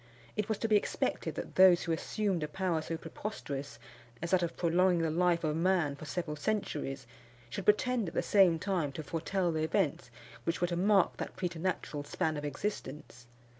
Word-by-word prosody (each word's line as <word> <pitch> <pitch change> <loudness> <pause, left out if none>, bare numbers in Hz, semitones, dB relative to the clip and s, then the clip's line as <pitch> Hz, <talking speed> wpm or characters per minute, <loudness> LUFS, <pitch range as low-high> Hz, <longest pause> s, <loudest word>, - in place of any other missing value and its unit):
It 210 0 -2
was 220 - 0
to 225 - -1
be 215 - +4
expected - - -2
that - - -6
those 185 -2 +7
who 170 - -2
assumed 190 +2 -1
a 150 - -1
power 170 0 -1
so 165 +1 -4
preposterous 145 - -6 0.4
as 170 - -4
that 185 -1 +4
of 170 -1 -2
prolonging 175 0 +3
the 160 - +1
life 175 +1 +2
of 155 -1 0
man 170 -4 +2
for 150 - -9
several 150 0 -3
centuries, 145 - -2 0.5
should 195 - -4
pretend, 230 +1 +3
at 165 - -7
the - - +1
same 190 -5 +5
time, 170 -4 -1
to 155 - -5
foretell 170 +4 -1
the 160 -1 -1
events 165 0 0 0.3
which 165 - -1
were 175 - +2
to 175 0 -2
mark 195 +1 +3
that - - -5
preternatural 175 -4 -2
span 160 +2 -1
of 145 - -4
existence. 145 -5 -5
170 Hz, 190 wpm, -32 LUFS, 155-190 Hz, 0.5 s, those